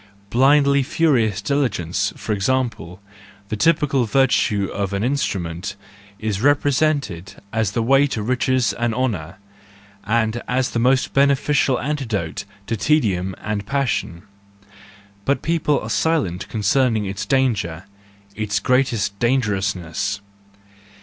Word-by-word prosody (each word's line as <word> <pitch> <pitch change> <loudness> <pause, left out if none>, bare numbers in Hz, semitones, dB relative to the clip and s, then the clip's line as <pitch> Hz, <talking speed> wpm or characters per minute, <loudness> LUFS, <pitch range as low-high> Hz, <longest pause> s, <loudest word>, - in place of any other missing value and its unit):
Blindly 140 +3 +4
furious 130 - +1
diligence, 100 - 0
for 110 - -3
example, 110 -4 -1 0.5
the - - -2
typical 140 0 +2
virtue 110 -4 +2
of 100 -1 -2
an 100 +1 -1
instrument, 95 -8 -2 0.4
is 105 -2 -3
represented 140 - +1 0.2
as 110 -3 0
the 115 - 0
way 135 +4 +4
to 110 -6 -3
riches 125 -1 +1
and 115 +2 -1
honour, 100 -12 -2 0.7
and 110 +2 0
as 125 0 0
the 120 - -1
most 130 +2 +2
beneficial 140 -1 +2
antidote 115 - -3 0.2
to 115 - -2
tedium 100 - +1
and 105 -1 -4
passion: 130 -11 -1 1.0
but 140 +6 0
people 160 -3 +1
are 105 - -7
silent 135 - 0
concern¬ 120 +2 +2
ing 105 - -2
its 95 +1 -4
danger, 110 -11 0 0.5
its 105 -1 -1
greatest 115 -4 +1
dangerousness. 105 -7 -1
115 Hz, 115 wpm, -21 LUFS, 100-135 Hz, 1.0 s, Blindly